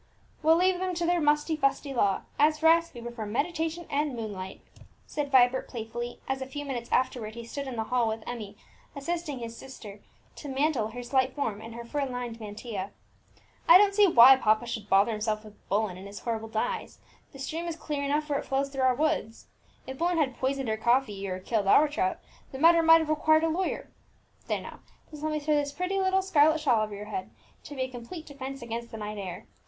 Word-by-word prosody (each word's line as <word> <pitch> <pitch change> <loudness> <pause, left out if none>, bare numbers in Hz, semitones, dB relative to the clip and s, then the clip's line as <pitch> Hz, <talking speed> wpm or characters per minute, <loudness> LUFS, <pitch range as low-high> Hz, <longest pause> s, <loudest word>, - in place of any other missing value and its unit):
"We'll 320 +1 +5
leave 365 +1 +2
them 370 -1 -2
to 340 0 -1
their 350 0 +2
musty 300 +1 +2
fusty 275 -1 0
law; 200 -6 +1 0.2
as 305 +1 +4
for 320 +1 +4
us, 335 0 +4
we 240 - -10
prefer 235 -2 -6
meditation 320 +8 -2
and 285 -1 -1
moonlight!" 200 -5 -6 0.4
said 295 -1 -3
Vibert 255 0 +4
playfully, 240 +1 -6
as 265 0 -2
a 265 - -4
few 290 +2 -6
minutes 245 -4 -5
afterwards 235 -4 0
he 235 0 -7
stood 275 +4 -5
in 260 - -5
the 225 - -1
hall 245 0 +1
with 220 0 -3
Emmie, 210 -4 -6 0.4
assisting 300 0 -3
his 230 -1 -7
sister 225 -6 -10 0.4
to 295 - -8
mantle 270 -4 +1
her 245 +3 -7
slight 260 +1 +1
form 220 -8 -2
in 225 +1 -9
her 235 0 -8
fur 285 +4 -2
lined 245 -3 -5
mantilla. 210 -2 -6 0.8
"I 340 - +11
don't 400 0 +4
see 410 0 +6
why 260 -4 +9
papa 215 -2 +2
should 220 -3 -5
bother 195 +3 +4
himself 215 0 -2
with 210 -1 -17
Bullen 200 -3 0
and 190 +2 -9
his 200 0 -9
horrible 225 -1 -3
dyes; 455 - -3 0.3
the - - -12
stream 320 +5 -4
is 335 - -3
clear 300 -3 -4
enough 295 +2 0
where 285 -2 0
it - - -7
flows 275 +1 0
through 270 -1 -4
our 260 -1 +4
woods. 300 -6 -1 0.4
If 265 0 -8
Bullen 345 +1 +1
had 270 -5 +1
poisoned 270 0 -1
our 220 0 0
coffee, 220 -4 +1
or 185 -1 -3
killed 205 +1 -1
our 300 +9 +6
trout, 290 -11 -1 0.3
the 265 - -6
matter 335 +3 +6
might 325 0 +7
have 315 - -4
required 315 +1 +3
a 325 - +2
lawyer. 360 +4 -2 0.6
There - - -1
now, - - -10 0.3
just 300 -1 -9
let 310 0 -1
me 305 - -1
throw 300 +1 0
this 290 -1 +1
pretty 365 +5 -2
little 380 0 +2
scarlet 315 -3 +4
shawl 245 -8 +3
over 210 -1 -5
your 205 +1 -7
head, 375 - -5 0.4
to 290 - -8
be 260 - -1
a - - -2
complete 255 +7 -9
defence 270 -2 -7
against 235 0 -5
the 225 - -8
night 210 -1 -5
air! 185 -3 -6
265 Hz, 220 wpm, -28 LUFS, 225-310 Hz, 0.8 s, I